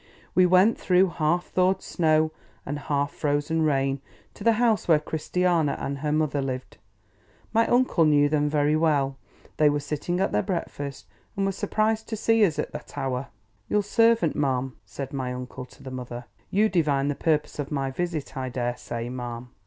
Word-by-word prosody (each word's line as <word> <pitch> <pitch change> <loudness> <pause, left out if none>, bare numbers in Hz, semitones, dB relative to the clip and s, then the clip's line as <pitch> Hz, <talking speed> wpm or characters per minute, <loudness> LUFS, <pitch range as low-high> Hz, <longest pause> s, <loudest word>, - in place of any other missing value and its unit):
We 185 -1 +5
went, 185 +5 +4
through 185 0 +3
half 170 +2 0
thawed 185 +1 +1
snow 155 -2 +2 0.3
and 145 +1 -3
half 145 0 -1
frozen 145 +2 0
rain, 135 -3 +1 0.3
to - - -10
the 230 - +5
house 225 -1 +2
where 160 -3 +6
Christiana 160 0 0
and 140 0 -3
her 150 +1 -1
mother 150 -2 +1
lived. 130 -1 -5 0.8
My 230 +1 +3
uncle 245 -9 +3
knew 145 -1 +5
them 150 0 +1
very 150 0 +2
well. 145 -4 +2 0.4
They 150 -1 +5
were 145 0 0
sitting 150 +5 -3
at 195 - +1
their 105 - +2
breakfast, 145 - -4 0.3
and 195 - +1
were 195 - +1
surprised 215 +3 -1
to 220 - -3
see 225 +1 +3
us 170 -7 +2
at - - -2
that - - -9
hour. 130 0 -2 0.4
"Your 210 0 +2
servant, 225 - +3
ma'am," 130 -3 0
said 135 +7 -6
my 130 -2 -2
uncle 125 0 -7
to - - -18
the 130 - -7
mother. 125 -1 -6 0.2
"You 210 +3 +3
divine 150 -8 +1
the 145 - +1
purpose 150 0 0
of 145 - -3
my 135 -2 -1
visit, 165 0 -3
I 130 -1 -3
dare 120 -1 -2
say, 120 0 -5
ma'am. 120 -1 -6
150 Hz, 185 wpm, -26 LUFS, 135-180 Hz, 0.8 s, where